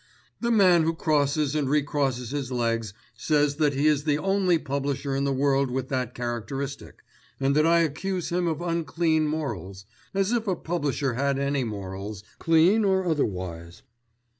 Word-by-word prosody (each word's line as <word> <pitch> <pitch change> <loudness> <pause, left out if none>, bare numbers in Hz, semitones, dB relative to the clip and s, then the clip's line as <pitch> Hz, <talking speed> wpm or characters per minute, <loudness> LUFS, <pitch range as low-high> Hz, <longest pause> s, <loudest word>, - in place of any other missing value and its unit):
"The 235 - -1
man 190 -7 +5
who 165 +1 0
crosses 150 -2 +1
and 145 -3 0
recrosses 140 -4 0
his 140 -3 -3
legs 115 -3 -1 0.2
says 145 +3 +1
that 150 -3 +2
he 140 +2 +1
is 150 -2 +3
the 145 -1 +1
only 190 0 +2
publisher 140 -1 -2
in 140 +1 0
the 140 - +1
world 135 0 +2
with 130 +1 -3
that 125 -3 -2
characteristic, 120 +4 -5 0.4
and 135 +1 +1
that 155 +1 +4
I 170 0 +5
accuse 180 +3 -2
him 175 0 0
of 165 0 -2
unclean 165 -2 0
morals, 100 - -4 0.3
as 195 +2 +1
if 235 -2 0
a 190 - +1
publisher 145 -6 -2
had 140 +2 0
any 140 -1 0
morals, 100 -2 -6 0.2
clean 170 +7 +4
or 190 -2 +2
otherwise. 90 - -3
145 Hz, 165 wpm, -26 LUFS, 130-165 Hz, 0.4 s, man